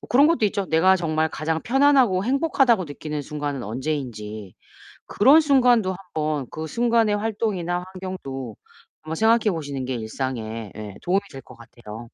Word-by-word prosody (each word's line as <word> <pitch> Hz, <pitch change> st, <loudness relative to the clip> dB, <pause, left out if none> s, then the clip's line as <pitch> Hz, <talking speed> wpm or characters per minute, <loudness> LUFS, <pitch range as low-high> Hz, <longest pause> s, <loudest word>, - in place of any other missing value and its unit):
어 -, -, -12 dB
그런 275 Hz, +4 st, +5 dB
것도 325 Hz, -8 st, +2 dB
있죠. 200 Hz, 0 st, -2 dB
내가 180 Hz, +4 st, +4 dB
정말 160 Hz, -2 st, 0 dB
가장 160 Hz, +1 st, -2 dB
편안하고 260 Hz, -7 st, +3 dB
행복하다고 265 Hz, -, +2 dB
느끼는 150 Hz, 0 st, -6 dB
순간은 145 Hz, -3 st, -4 dB
언제인지 110 Hz, -5 st, -5 dB, 0.5 s
그런 275 Hz, +9 st, +6 dB
순간도 245 Hz, -9 st, +3 dB
한번 155 Hz, -7 st, -3 dB
그 160 Hz, 0 st, -5 dB
순간의 230 Hz, +2 st, +2 dB
활동이나 205 Hz, -5 st, -2 dB
환경도 135 Hz, -, -6 dB, 0.5 s
한번 160 Hz, +1 st, -5 dB
생각해 225 Hz, +2 st, +3 dB
보시는 145 Hz, -6 st, -4 dB
게 130 Hz, 0 st, -3 dB
일상에 115 Hz, -2 st, -5 dB
예 105 Hz, -2 st, -8 dB
도움이 190 Hz, +3 st, +1 dB
될 135 Hz, -, -9 dB
것 125 Hz, -, -15 dB
같아요. 115 Hz, -2 st, -11 dB
160 Hz, 350 characters per minute, -23 LUFS, 130-220 Hz, 0.5 s, 그런